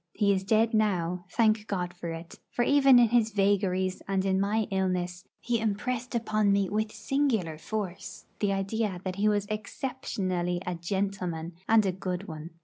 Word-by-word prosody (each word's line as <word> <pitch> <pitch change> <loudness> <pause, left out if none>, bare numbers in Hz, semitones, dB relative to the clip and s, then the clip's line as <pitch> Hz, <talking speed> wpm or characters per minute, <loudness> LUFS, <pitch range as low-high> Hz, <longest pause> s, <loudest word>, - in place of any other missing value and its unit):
He 200 -2 +3
is 190 -1 -1
dead 220 +3 +2
now, 180 -5 +1
thank 220 0 +2
God 180 -3 -2
for 175 -1 -6
it; 165 +1 -8
for 240 - 0
even 275 -1 +6
in 240 -2 +6
his 230 -1 +3
vagaries 195 -2 +1
and 195 -1 0
in 190 0 +2
my 215 +3 +1
illness 180 -2 -1
he 235 -1 0
impressed 235 +3 -2
upon 215 -3 +2
me 200 -1 +2
with 215 +1 0
singular 225 - 0
force 200 -1 -5
the 205 -2 +1
idea 195 0 -1
that 185 0 -4
he 210 +1 +3
was 205 -1 +1
exceptionally 200 -5 -3
a 180 - -2
'gentleman,' 175 -2 -3 0.2
and 220 -2 +5
a 190 - +2
good 185 +1 -4
one. 160 0 -7
200 Hz, 170 wpm, -28 LUFS, 180-220 Hz, 0.2 s, even